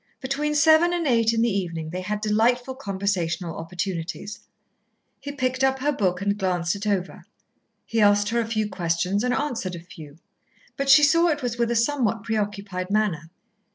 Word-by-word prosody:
Between 295 +3 -2
seven 315 +3 +5
and 345 -2 -1
eight 230 -4 +3
in 230 0 +1
the 230 -4 +1
evening 165 -4 -3
they 180 +1 -4
had 210 +3 -3
delightful 235 +4 +1
conversational 190 -7 -2
opportunities. 185 +4 -5 0.8
He 285 - -6
picked 260 -1 -1
up 265 0 +3
her 285 +3 0
book 185 -8 -1
and 205 0 0
glanced 180 -2 0
it 200 +1 -5
over, 190 -3 -2 0.6
he 225 -1 0
asked 205 0 +4
her 235 +1 0
a 230 - -1
few 215 -2 -1
questions 180 +2 -1
and 250 - 0
answered 235 -9 -2
a - - -7
few; 160 -3 -13 0.6
but 275 0 -2
she 275 +2 +8
saw 335 +4 +5
it 295 -4 -1
was 240 -1 -3
with 235 -1 +1
a 235 - 0
somewhat 230 -3 0
preoccupied 205 -4 -3
manner. 200 -6 0
210 Hz, 180 wpm, -24 LUFS, 185-255 Hz, 0.8 s, she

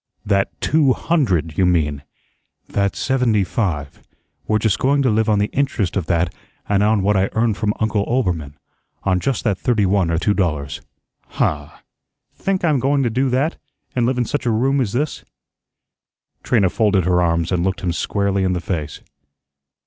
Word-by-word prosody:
"That 100 -1 +1
TWO 145 -4 +3
hundred, 95 - 0
you 95 - +4
mean." 75 -5 +1 0.7
"That 100 -1 -1
SEVENTY 125 -6 +1
FIVE. 85 - -3 0.5
We're 110 - +2
just 110 -2 0
going 140 +1 +2
to 130 - +3
live 110 +1 +1
on 105 - +3
the 105 +1 0
interest 130 -10 0
of 95 -5 -2
that 85 -1 +1 0.3
and 100 -1 +2
on 105 -1 +2
what 105 +1 +2
I 95 0 +2
earn 110 0 +2
from 105 0 -1
Uncle 110 -2 +1
Oelbermann 85 - -1 0.5
on 95 -2 +1
just 135 +2 -1
that 100 -5 0
thirty 110 -5 +1
one 95 -2 +2
or 85 - +1
two 100 +5 +1
dollars." 75 -8 -2 0.5
"Huh! 75 -1 -1 0.6
Think 190 -2 -1
I'm 150 -5 +2
going 140 +2 +1
to 120 - 0
do 130 +3 +1
that, 135 +6 0 0.4
an' 120 -2 +2
live 130 0 0
in 125 - +1
such 145 -1 -2
a - - +3
room 130 +5 +2
as 105 -6 -2
this?" 145 +4 -2 1.2
Trina 100 -7 +2
folded 100 -5 +2
her 90 -1 +3
arms 85 0 0
and 90 -2 +1
looked 95 -2 -1
him 90 -2 -1
squarely 100 +2 0
in 95 -1 +1
the 90 - -1
face. 80 -5 -4
100 Hz, 180 wpm, -20 LUFS, 90-125 Hz, 1.2 s, you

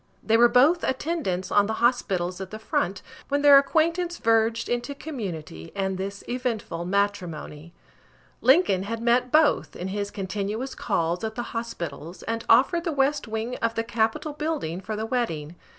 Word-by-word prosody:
They 225 - +2
were 240 +1 +6
both 300 +9 +4
attendants 260 - -2
on 205 0 +4
the 220 - -1
hospitals 190 -7 0
at 190 - -6
the 215 - -7
front, 200 -3 -2 0.3
when 285 +1 0
their 285 -1 +9
acquaintance 335 +4 0
verged 225 0 +2
into 240 +4 -2
community, 180 - -6
and 190 -1 -1
this 200 +1 -5
eventful 230 -9 -3
matrimony. 175 -5 -2 0.7
Lincoln 260 - +4
had 225 +4 -4
met 245 +2 +2
both, 310 -1 +3
in 185 - -5
his 200 +1 -3
continuous 205 +5 -4
calls 175 -4 -1
at 220 0 -3
the 240 - -3
hospitals, 170 -7 -6
and 230 0 -3
offered 275 +9 +5
the 340 - -1
west 280 -1 +1
wing 220 +3 -3
of 230 0 -1
the 225 - 0
Capitol 230 +5 -1
building 295 - -3
for 215 +3 -4
the 215 +1 -3
wedding. 175 -10 -2
225 Hz, 165 wpm, -25 LUFS, 190-260 Hz, 0.7 s, their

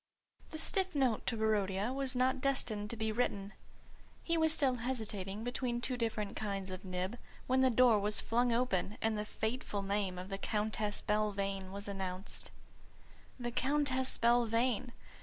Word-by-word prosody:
The 315 - -6
stiff 375 +2 +1
note 260 -6 +1
to 230 - 0
Barodia 210 0 +1
was 270 -1 0
not 255 +1 +2
destined 225 -6 +1
to 235 - -4
be 220 0 0
written. 210 -3 -1 0.7
He 335 - +1
was 320 -1 +3
still 275 -5 +2
hesitating 215 -5 -3
between 245 0 -1
two 250 +1 -2
different 225 -4 -2
kinds 195 -3 -3
of 185 0 -6
nib, 185 +5 -3 0.3
when 260 +1 +3
the 260 - +5
door 245 -2 +5
was 210 +1 +2
flung 240 +1 +1
open 230 -4 0
and 220 0 +1
the 210 0 -2
fateful 220 -2 -2
name 195 -2 -1
of 185 +1 -6
the 195 -1 -4
Countess 210 -1 -1
Belvane 200 -2 0
was 200 +1 -5
announced. 190 -1 -4 0.9
The 240 -1 -3
Countess 260 0 +1
Belvane! 235 0 +2
220 Hz, 160 wpm, -34 LUFS, 200-255 Hz, 0.9 s, the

